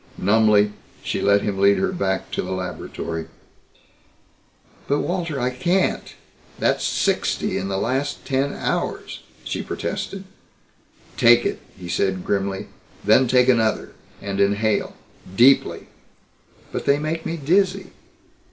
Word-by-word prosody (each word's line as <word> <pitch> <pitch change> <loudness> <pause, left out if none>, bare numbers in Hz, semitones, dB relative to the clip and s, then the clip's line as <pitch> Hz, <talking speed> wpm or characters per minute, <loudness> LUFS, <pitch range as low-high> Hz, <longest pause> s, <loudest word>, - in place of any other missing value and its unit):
Numbly 105 +1 +3 0.3
she - - -2
let 100 0 +3
him 100 -2 -2
lead 100 +1 +5
her 195 -1 0
back 95 - -2
to - - -1
the 95 +1 -4
laboratory. 85 -3 -5 1.6
"But, 145 +1 +1
Walter 170 -5 -2
I 125 0 0
can't. 175 +9 0 0.4
That's - - +1
sixty - - 0
in 95 - -2
the 95 0 -2
past 135 +6 -2
ten 135 +1 0
hours!" - - -3 0.2
she - - -3
protested. 195 -1 -4 0.9
"Take - - +6
it," - - -1 0.2
he 90 -2 -9
said 95 +1 -1
grimly, 100 0 -1 0.4
"then 110 +5 +5
take 125 +1 +4
another. 115 -4 +2 0.3
And 100 -1 -3
inhale. 100 +1 +1 0.4
Deeply." 130 +6 +4 0.9
"But - - -4
they 140 - +4
make 155 +2 -3
me 165 - -3
dizzy." 185 +5 +1
110 Hz, 125 wpm, -22 LUFS, 100-145 Hz, 1.6 s, Take